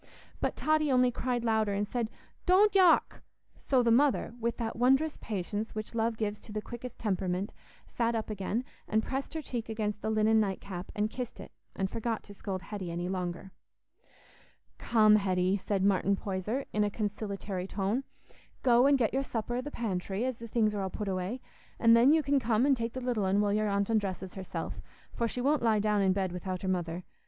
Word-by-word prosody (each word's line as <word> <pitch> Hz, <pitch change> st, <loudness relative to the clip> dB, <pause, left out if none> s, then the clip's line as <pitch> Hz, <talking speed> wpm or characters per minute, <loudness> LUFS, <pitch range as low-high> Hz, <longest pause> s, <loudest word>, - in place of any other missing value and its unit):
But -, -, -1 dB
Totty 310 Hz, -2 st, +2 dB
only 250 Hz, -1 st, +4 dB
cried 245 Hz, -1 st, -2 dB
louder, 220 Hz, -2 st, +2 dB
and 205 Hz, +1 st, -1 dB
said, 235 Hz, 0 st, -2 dB, 0.4 s
"Don't 395 Hz, +3 st, +5 dB
yock!" 370 Hz, -4 st, +4 dB, 0.3 s
So 260 Hz, -3 st, +1 dB
the 235 Hz, -, +3 dB
mother, 265 Hz, -1 st, +3 dB
with 235 Hz, 0 st, -1 dB
that 225 Hz, -2 st, -3 dB
wondrous 270 Hz, +6 st, +2 dB
patience 210 Hz, +2 st, -3 dB
which 215 Hz, +1 st, -5 dB
love 225 Hz, 0 st, 0 dB
gives 210 Hz, -1 st, -2 dB
to 220 Hz, -, -11 dB
the 215 Hz, -, -2 dB
quickest 240 Hz, +2 st, -8 dB
temperament, 190 Hz, -2 st, -1 dB, 0.3 s
sat 235 Hz, -1 st, -1 dB
up 220 Hz, -1 st, -2 dB
again, 210 Hz, +4 st, -2 dB, 0.2 s
and 220 Hz, +1 st, +1 dB
pressed 270 Hz, +6 st, -4 dB
her 315 Hz, -, -3 dB
cheek 235 Hz, -4 st, -4 dB
against 210 Hz, -2 st, -2 dB
the -, -, -2 dB
linen 220 Hz, 0 st, +3 dB
night 195 Hz, -3 st, 0 dB
cap 185 Hz, -2 st, -7 dB
and 210 Hz, 0 st, 0 dB
kissed 245 Hz, -1 st, -6 dB
it, -, -, -9 dB, 0.2 s
and 190 Hz, -, 0 dB
forgot 225 Hz, +2 st, -3 dB
to 205 Hz, -, -12 dB
scold 190 Hz, -2 st, -5 dB
Hetty 200 Hz, -4 st, -5 dB
any 175 Hz, +1 st, -3 dB
longer. 180 Hz, 0 st, -4 dB, 1.3 s
"Come, 215 Hz, -2 st, +5 dB
Hetty," 185 Hz, -1 st, +1 dB
said 200 Hz, 0 st, -1 dB
Martin 200 Hz, 0 st, +3 dB
Poyser, 200 Hz, +7 st, -3 dB
in 210 Hz, -, +2 dB
a 205 Hz, -, +1 dB
conciliatory 200 Hz, -3 st, -4 dB
tone, 200 Hz, +7 st, -1 dB, 0.6 s
"go 245 Hz, +1 st, +5 dB
and 280 Hz, 0 st, +5 dB
get 235 Hz, -4 st, +1 dB
your 270 Hz, -, +2 dB
supper 240 Hz, -2 st, -3 dB
i' -, -, 0 dB
the 290 Hz, -, -6 dB
pantry, 200 Hz, -3 st, -2 dB
as 255 Hz, -2 st, -3 dB
the 230 Hz, -, -7 dB
things 215 Hz, -2 st, +1 dB
are 205 Hz, -, -2 dB
all 190 Hz, -, -2 dB
put 205 Hz, +2 st, -4 dB
away; 190 Hz, +7 st, -3 dB, 0.4 s
an' 230 Hz, -1 st, +6 dB
then 235 Hz, +4 st, +7 dB
you 315 Hz, 0 st, +4 dB
can 280 Hz, -1 st, +2 dB
come 230 Hz, 0 st, +2 dB
and 280 Hz, -1 st, +4 dB
take 230 Hz, -1 st, -3 dB
the 260 Hz, -, -4 dB
little 240 Hz, -5 st, 0 dB
un 190 Hz, +2 st, +2 dB
while 205 Hz, -1 st, +2 dB
your 215 Hz, 0 st, +1 dB
aunt 200 Hz, 0 st, +1 dB
undresses 195 Hz, -4 st, -1 dB
herself, 190 Hz, -2 st, -5 dB, 0.3 s
for 235 Hz, -, 0 dB
she 245 Hz, -, -4 dB
won't 285 Hz, +2 st, +2 dB
lie 225 Hz, -2 st, +3 dB
down 210 Hz, 0 st, +2 dB
in 190 Hz, -1 st, +3 dB
bed 190 Hz, -1 st, 0 dB
without 185 Hz, +1 st, -4 dB
her -, -, -2 dB
mother. 175 Hz, -1 st, -2 dB
215 Hz, 205 wpm, -30 LUFS, 195-240 Hz, 1.3 s, then